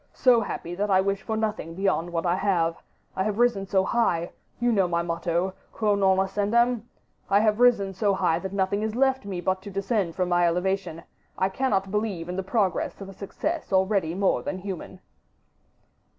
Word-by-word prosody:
so 245 -3 +5
happy 175 -4 -5
that 205 +3 -1
I 190 -1 +5
wish 195 0 0
for 220 -1 -3
nothing 210 -7 -3
beyond 190 -3 0
what 165 0 -2
I 175 - +2
have... 175 -4 +1 0.4
I - - -1
have 210 0 -2
risen 235 -5 +2
so 190 -1 +2
high... 180 -6 0 0.3
You 240 +1 +2
know 195 -5 +3
my 170 0 0
motto: 170 +2 -1 0.2
'Quo 215 -2 +1
non 190 -1 +3
ascendam?' 215 +5 +1 0.4
I 200 - +5
have 215 0 +2
risen 230 -6 +4
so 200 +1 +1
high 165 -3 +1
that 190 +1 -5
nothing 200 +1 0
is 220 0 -2
left 265 -2 +2
me 190 -3 -4
but 185 +1 0
to 200 - -8
descend 195 -2 -1
from 185 -1 0
my 175 0 +3
elevation. 180 -1 -1 0.3
I 190 - +1
cannot 195 -3 0
believe 205 -5 -2
in 180 - -3
the 190 - -1
progress 190 0 -1
of 195 -1 -8
a - - -9
success 305 - -4
already 190 -3 +2
more 195 0 +1
than 195 -1 -4
human." 185 -1 -7
195 Hz, 195 wpm, -26 LUFS, 185-210 Hz, 0.4 s, so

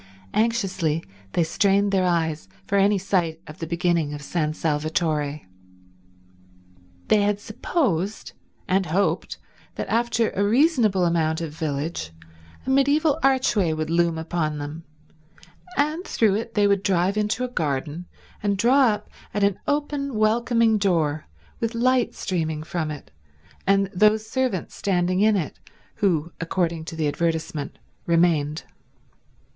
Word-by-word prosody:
Anxiously 190 -9 0 0.3
they 170 - +3
strained 200 +4 +2
their 190 -2 +2
eyes 160 - 0 0.2
for - - -1
any 200 +1 +4
sight 175 -4 0
of 150 - -11
the 165 - -4
beginning 170 -3 0
of 145 - -8
San 155 0 -1
Salvatore. 150 -1 -1 1.7
They 210 - +5
had 205 0 +1
supposed 210 - -2 0.4
and 190 0 +1
hoped 175 0 0 0.4
that - - -4
after 230 -1 +1
a 200 - 0
reasonable 225 - +3
amount 160 -1 +1
of 165 -3 -4
village 145 - -3 0.5
a 265 - -1
mediaeval 285 +3 +3
archway 255 -10 +2
would 155 0 -3
loom 170 -1 +2
upon 160 -2 -2
them, 150 +3 -7 0.9
and 305 +5 +1
through 220 - +2
it 230 +3 -3
they 205 -1 +4
would 200 -1 +3
drive 190 0 +1
into 215 +3 0
a - - 0
garden 155 - -3 0.3
and 200 -1 0
draw 255 +6 +5
up 210 -2 -1 0.3
at 205 - +1
an 200 -1 +2
open, 285 -2 -1
welcoming 225 0 +3
door, 160 -6 0 0.3
with 230 0 -2
light 250 +1 +2
streaming 160 -4 -2
from 160 -1 -3
it 150 -2 -8 0.6
and 195 0 +4
those 215 +3 +3
servants 250 -6 -1
standing 185 -2 0
in 215 0 +4
it 175 -7 -3 0.4
who, 170 -6 +1
according 165 -1 -1
to 165 - -7
the 155 -2 0
advertisement, 160 -1 -2 0.3
remained. 165 -3 +2
185 Hz, 135 wpm, -24 LUFS, 160-215 Hz, 1.7 s, They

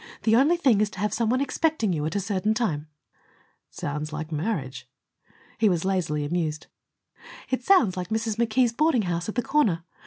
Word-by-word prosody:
The 220 0 +4
only 290 +8 +4
thing 255 -11 +3
is 215 - +1
to 195 - -11
have 210 +1 -1
some 230 -1 0
one 255 +3 +1
expecting 280 - 0
you 150 -3 -2
at 160 - -5
a - - +2
certain 205 +2 -1
time." 160 -11 -1 0.8
"It - - -27
sounds 150 +2 -4
like 155 +1 -5
marriage." 145 - -3 0.7
He 220 -2 +4
was 175 -1 0
lazily 165 -6 0
amused. 155 -1 -2 0.9
"It 260 -1 -1
sounds 265 - +4
like 180 -1 -4
Mrs. 220 0 -1
McKee's 235 +1 +2
boarding 290 -3 +2
house 175 +1 -2
at - - -5
the 245 - 0
corner. 205 - +1
205 Hz, 190 wpm, -25 LUFS, 165-235 Hz, 0.9 s, The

